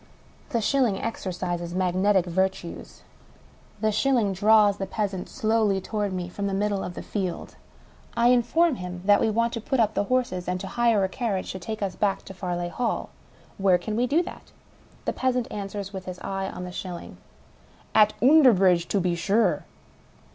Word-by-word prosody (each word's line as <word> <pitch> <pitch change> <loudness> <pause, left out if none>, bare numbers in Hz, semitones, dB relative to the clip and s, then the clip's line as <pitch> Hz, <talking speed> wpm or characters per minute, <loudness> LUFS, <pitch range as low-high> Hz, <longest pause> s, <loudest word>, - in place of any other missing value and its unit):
The 230 - 0
shilling 240 -4 +2
exercises 175 -5 -4
magnetic 185 +1 +2
virtues. 190 0 -3 0.8
The 215 - +2
shil 260 +6 +2
ling 205 -5 +1
draws 205 +1 +4
the 195 - -4
peasant 195 -2 -3
slowly 215 -3 +1
toward 205 +1 -2
me 180 -1 -3
from 200 +3 -4
the 195 - -1
middle 200 -1 0
of 175 - -6
the - - -6
field. 190 -4 -4 0.6
I 235 +1 +5
inform 250 +5 +3
him 180 -1 -7
that 205 0 +5
we - - +2
want 230 +2 +1
to 230 - -3
put 265 +4 -1
up 220 -2 +3
the 205 - 0
horses 235 -7 -1
and 180 0 -1
to 195 - -6
hire 230 0 +2
a - - +2
carriage 200 -3 -3
to 190 - -6
take 215 +3 -5
us 190 -3 -2
back 200 -2 0
to 195 - -9
Farleigh 175 -2 -3
Hall. 245 +2 -2 0.5
Where 190 -2 +4
can 210 +4 -4
we 245 +3 +1
do 310 +7 +2
that? - - -11 0.5
The - - 0
peasant 255 -2 0
answers 200 -1 -5
(with 190 -1 -6
his 185 -1 -6
eye 195 0 -3
on 180 - -7
the 180 - -6
shilling): 180 -1 -7 0.8
"At 215 0 +5
Oonderbridge, 195 - +5
to 200 - +1
be 180 -1 0
zure." 195 +7 +1
200 Hz, 185 wpm, -25 LUFS, 185-225 Hz, 0.8 s, I